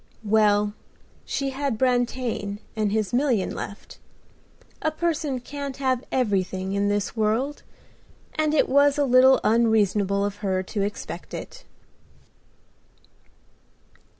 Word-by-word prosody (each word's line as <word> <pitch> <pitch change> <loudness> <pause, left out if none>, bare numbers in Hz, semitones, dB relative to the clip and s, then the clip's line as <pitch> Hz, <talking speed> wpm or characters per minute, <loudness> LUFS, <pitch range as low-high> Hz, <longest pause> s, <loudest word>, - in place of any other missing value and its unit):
Well, 210 -1 +3 0.5
she 275 -1 -2
had 270 -3 -2
Brantain 245 -4 0 0.2
and 215 -2 0
his 215 +1 -1
million 245 -6 +1
left. 205 - -8 0.8
A 315 - +1
person 310 -4 -1
can't 280 +1 -6
have 260 -2 0
everything 190 -5 0
in 200 0 +1
this 205 +1 -1
world; 225 +7 0 0.7
and 310 0 +1
it - - +3
was 285 +1 +4
a 290 - +2
little 260 +1 +6
unreasonable 210 -3 +2
of 205 0 -4
her 190 -3 -1
to 200 +2 -4
expect 205 +1 -5
it. - - -9
230 Hz, 115 wpm, -24 LUFS, 205-270 Hz, 0.8 s, little